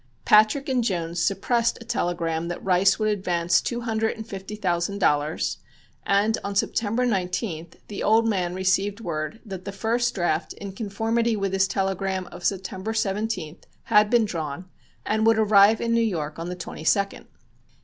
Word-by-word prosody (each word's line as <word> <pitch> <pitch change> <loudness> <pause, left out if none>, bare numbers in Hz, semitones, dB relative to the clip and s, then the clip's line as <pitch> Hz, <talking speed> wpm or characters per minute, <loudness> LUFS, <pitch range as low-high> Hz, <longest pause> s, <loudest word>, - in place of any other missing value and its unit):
Patrick 215 +6 +4
and 255 -3 +1
Jones 170 -5 -2
suppressed 230 +4 +1
a 230 - -11
telegram 170 -5 -1
that 175 - -5
Rice 190 +1 +4
would 215 -1 0
advance 175 -4 +1
two 240 -1 -3
hundred 225 -1 -1
and 220 - -7
fifty 195 0 -7
thousand 185 -1 -1
dollars, 150 -4 0 0.5
and 205 +3 +2
on 200 0 -4
September 225 +4 0
19th 180 -5 -2
the 205 - -6
old 225 +2 +3
man 180 -5 -1
received 195 +2 +1
word 170 +2 -4
that 190 -3 -7
the - - -4
first 230 +4 0
draft 170 -4 -1
in 200 -1 -8
conformity 225 +3 -1
with 195 -2 -2
his 195 0 +3
telegram 190 -1 -1
of 175 0 -10
September 190 +2 -2
17th 200 -6 -2 0.2
had 210 0 +4
been 235 -1 +4
drawn 165 -2 -5 0.4
and 215 +1 0
would 225 -1 +5
arrive 215 0 +5
in 230 0 0
New 230 - +3
York 165 -9 -2
on 170 +1 -4
the 180 - -4
22d. 195 +3 -1
195 Hz, 165 wpm, -24 LUFS, 175-220 Hz, 0.5 s, would